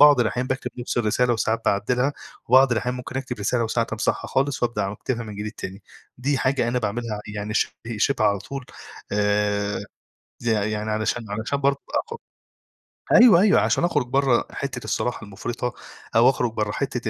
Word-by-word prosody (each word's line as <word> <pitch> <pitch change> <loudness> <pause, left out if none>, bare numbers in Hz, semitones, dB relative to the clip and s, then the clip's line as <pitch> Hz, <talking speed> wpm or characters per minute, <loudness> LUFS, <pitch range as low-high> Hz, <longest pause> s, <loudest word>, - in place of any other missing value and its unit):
بعض 145 -3 +8
الأحيان 120 +2 0
باكتب 130 +1 -2
نَفس 120 0 -2
الرسالة 120 +2 +2
وساعات 115 0 0
باعدّلها، 125 +7 +1 0.4
وبعض 130 +1 +6
الأحيان 125 +2 -1
ممكن 125 +1 -6
أكتب 130 -3 -4
رسالة 115 +4 0
وساعات 115 0 -1
أمسحها 110 - -1
خالص 135 -1 0
وابدأ 110 -5 0
واكتبها 115 +5 -3
من 105 -2 -8
جديد 105 +1 -4
تاني. 95 -2 -8 0.4
دي 135 +2 0
حاجة 130 -3 +1
أنا 125 +1 +1
باعملها 110 -1 -3
يعني 105 +1 -4
شِبه - - +1 0.3
شِبه 125 0 +2
على 100 -1 +3
طول، 135 +7 -7 0.5
آآ، 105 0 +1 0.6
يع 110 -3 +1
يعني 105 +1 -2
علشان 110 +2 -1
علشان 110 +7 -2
برضو 140 0 +2 0.3
أخ 465 - -4 1.0
أيوه 230 -8 +8
أيوه 205 0 +5
عشان - - +1
أخرج 145 -7 +1
برّا 135 -1 +3
حِتّة 135 -3 -4
الصراحة 120 -2 -2
المفرطة، 120 +5 -4 0.4
أو 120 +3 +7
أخرج 120 -4 0
برّا 105 -2 -1
حِتّة 125 -2 -2
120 Hz, 170 wpm, -24 LUFS, 105-130 Hz, 1.0 s, بعض